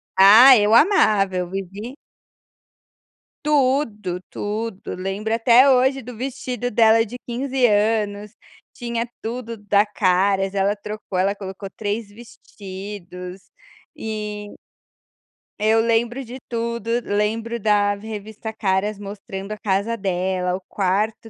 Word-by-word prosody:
Ah, 220 +8 +9
eu 210 +1 +3
amava, 215 - +4
eu 180 -1 -2
vivi 195 +6 -6 1.5
Tudo, 255 -10 +1
tudo, 210 -1 -5
lembro 195 +4 -3
até 235 +4 +5
hoje 265 +1 +3
do 250 0 -9
vestido 245 -1 -4
dela 225 +1 +4
de 245 +4 -8
15 255 +1 0
anos, 210 -1 0 0.4
tinha 235 -1 -3 0.2
tudo 230 0 -5
da 205 0 +2
Caras, 195 0 +1
ela 200 +1 +1
trocou, 210 -2 -5
ela 195 +2 +1
colocou 195 0 -8
3 210 +1 -3
vestidos 190 -4 -10 0.4
e 210 -1 -5 1.1
eu 220 +1 +3
lembro 235 +3 0
de 245 +3 -9
tudo, 235 -1 -3
lembro 220 +3 -1
da 205 -1 +2
revista 215 +1 -7
Caras 205 -1 -1
mostrando 195 0 -8
a 215 - -4
casa 205 +2 -1
dela, 185 -2 -1
o 190 - -7
quarto 215 +4 -1
210 Hz, 115 wpm, -21 LUFS, 195-230 Hz, 1.5 s, Ah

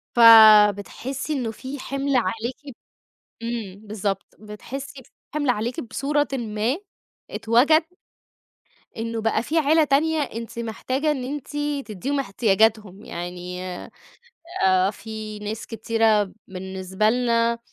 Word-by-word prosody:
فبتحسي 225 +4 +6
إنّه 250 -6 -2
في 265 +5 -8
حِمل 275 +1 -2
عليكِ 240 +5 -2 0.7
إمم 220 -3 -5
بالضبط، 205 -2 -3
بتحسي 260 +6 -8
في - - -26 0.2
حِمل 290 -3 -1
عليكِ 240 +1 -1
بصورةٍ 290 +5 -1
ما 230 +1 -1 0.5
إتوَجَد 260 +8 +3 1.1
إنّه 225 0 -3
بَقى 225 0 +1
في 315 +6 -1
عيلة 315 +1 +4
تانية 310 +3 +2
أنتِ 235 -5 -5
محتاجة 255 +6 -1
إن 270 -4 -3
أنتِ 280 +1 -5 0.4
تدّيهم 250 +7 -3
إحتياجاتهم. 215 -3 +1
يعني 180 +1 -6 1.0
آآ 185 +1 +3
في 215 -1 -8
ناس 210 +1 -5
كتيرة 220 -2 +1
بالنسبة 190 +2 -2
لنا 235 -1 +1
230 Hz, 110 wpm, -23 LUFS, 210-265 Hz, 1.1 s, فبتحسي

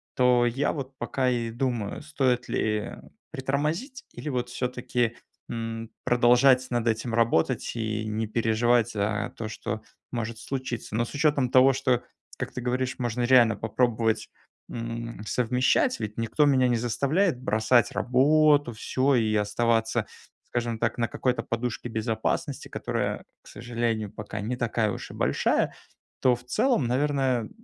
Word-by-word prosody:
то 125 -1 +4
я 125 +5 0
вот 135 -3 -6
пока 130 -1 0
и 120 -2 -1
думаю: 120 -4 -2
стоит 130 -5 0
ли 105 -1 -1 0.4
притормозить 150 - -2
или 155 - -6
вот 125 -3 -2
всё-таки, 125 -2 -1 0.3
м, 115 -1 -4
продолжать 125 +2 +5
над 120 -1 0
этим 115 +1 -1
работать 115 -6 +1
и 110 -2 -2
не 110 +1 -1
переживать 115 +1 +2
за 105 +2 -1
то, 110 - -4
что 110 0 -5 0.3
может 115 -2 -4
случиться. 130 -4 -4
Но 120 +1 +1
с - - -10
учётом 145 -4 +2
того, 130 +2 +6
что 130 -2 +1 0.4
как - - -3
ты 130 - -4
говоришь, 130 +1 -1
можно 120 -1 -1
реально 120 -3 +5
попробовать, 115 0 0 0.4
м, 115 -1 -5
совмещать. 125 +3 +2
Ведь 105 -2 -5
никто 115 +6 +2
меня 130 -3 +4
не 120 - +2
заставляет 140 - +1
бросать 110 +2 +3
работу 145 +2 +3
всё 130 +5 +1
и 110 -3 +2
оставаться, 115 +2 +1 0.4
скажем 120 -2 -2
так, 115 0 0
на 120 -1 +1
какой-то 125 +1 -1
на - - -18
подушке 120 +1 -3
безопасности, 110 0 -2
которая, - - -2 0.2
к - - -19
сожалению, 115 -3 -2
пока 105 0 -6
не 115 +5 -2
такая 115 -3 0
уж - - -7
и - - -10
большая, - - +1 0.5
то 125 -1 +4
в 120 - -13
целом 215 - +1
наверное, 130 -3 +1
120 Hz, 150 wpm, -26 LUFS, 115-130 Hz, 0.5 s, того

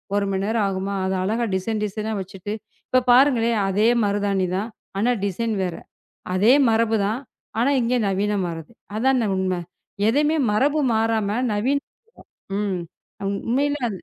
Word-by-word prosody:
1 205 0 +1
மணி 190 0 -1
நேரம் 220 -1 +1
ஆகுமா? 195 +1 -2
அதை 190 0 0
அழகா 225 +5 0
டிசைன் 210 +3 -2
டிசைன் 210 +1 -4
ஆக 215 - -2
வைத்துவிட்டு, 195 +2 -6 0.4
இப்போ 255 - +4
பாருங்களேன், 245 -3 +4
அதே 205 +3 +2 0.2
மருதாணி 200 -2 0
தான். 210 +4 -3 0.3
ஆனால் 240 +2 +1
டிசைன் 220 +3 -1
வேறு. 180 -2 -4 0.5
அதே 210 +7 +5 0.2
மரபுதான். 220 -1 +1 0.4
ஆனால் 275 +4 +3
இங்கு 245 +2 +1
நவீனமாகுது. 190 -4 -2 0.3
அதான் 260 +1 +2
உண்மை! 185 -1 0 0.5
எதையுமே 295 +7 +3 0.2
மரபு 280 +8 +2
மாறாமல் 220 +1 +1
நவீன 245 +7 +1 0.8
ம் 200 -3 -1 0.4
அம் 195 - -1 0.2
உண்மையிலே... 280 +1 +1
215 Hz, 135 wpm, -23 LUFS, 195-240 Hz, 0.8 s, அதே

